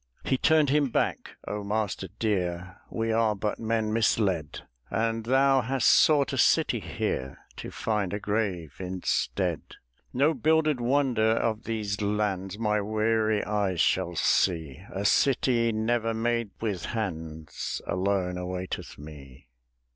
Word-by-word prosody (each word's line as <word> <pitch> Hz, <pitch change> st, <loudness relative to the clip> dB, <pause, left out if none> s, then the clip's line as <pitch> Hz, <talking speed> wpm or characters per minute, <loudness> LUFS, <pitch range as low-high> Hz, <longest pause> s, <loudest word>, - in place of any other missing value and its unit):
"He -, -, +1 dB
turned 150 Hz, +1 st, +3 dB
him 145 Hz, -2 st, +2 dB
back, -, -, -1 dB
'O 105 Hz, 0 st, -3 dB
master 100 Hz, -2 st, -2 dB
dear, 90 Hz, -4 st, -2 dB
We 115 Hz, 0 st, -2 dB
are 110 Hz, -1 st, +2 dB
but 105 Hz, +1 st, -3 dB
men 110 Hz, -1 st, -1 dB
misled; 100 Hz, -8 st, +1 dB, 0.3 s
And 115 Hz, +1 st, -1 dB
thou 135 Hz, +2 st, +4 dB
hast 130 Hz, +1 st, 0 dB
sought 145 Hz, -3 st, +4 dB
a -, -, -1 dB
city -, -, +3 dB
here 65 Hz, +1 st, -3 dB, 0.2 s
To -, -, -6 dB
find 105 Hz, -4 st, -2 dB
a 100 Hz, -, -2 dB
grave 100 Hz, -8 st, -2 dB
instead. 90 Hz, -1 st, -1 dB, 0.5 s
"'No 140 Hz, +5 st, +2 dB
builded 155 Hz, -4 st, +2 dB
wonder 120 Hz, -4 st, +2 dB
of 115 Hz, 0 st, -1 dB
these 105 Hz, -2 st, -3 dB
lands 100 Hz, -2 st, -1 dB
My 105 Hz, -2 st, +1 dB
weary 110 Hz, 0 st, +1 dB
eyes 100 Hz, -4 st, -1 dB
shall 90 Hz, 0 st, +1 dB
see; 80 Hz, -4 st, +1 dB
A 100 Hz, +1 st, -4 dB
city 120 Hz, 0 st, +3 dB
never 115 Hz, +1 st, 0 dB
made 115 Hz, -1 st, 0 dB
with 100 Hz, -6 st, -3 dB
hands 80 Hz, -8 st, -4 dB
Alone 90 Hz, 0 st, -1 dB
awaiteth 90 Hz, 0 st, -5 dB
me.'" 70 Hz, -4 st, -12 dB
105 Hz, 130 wpm, -27 LUFS, 95-115 Hz, 0.5 s, thou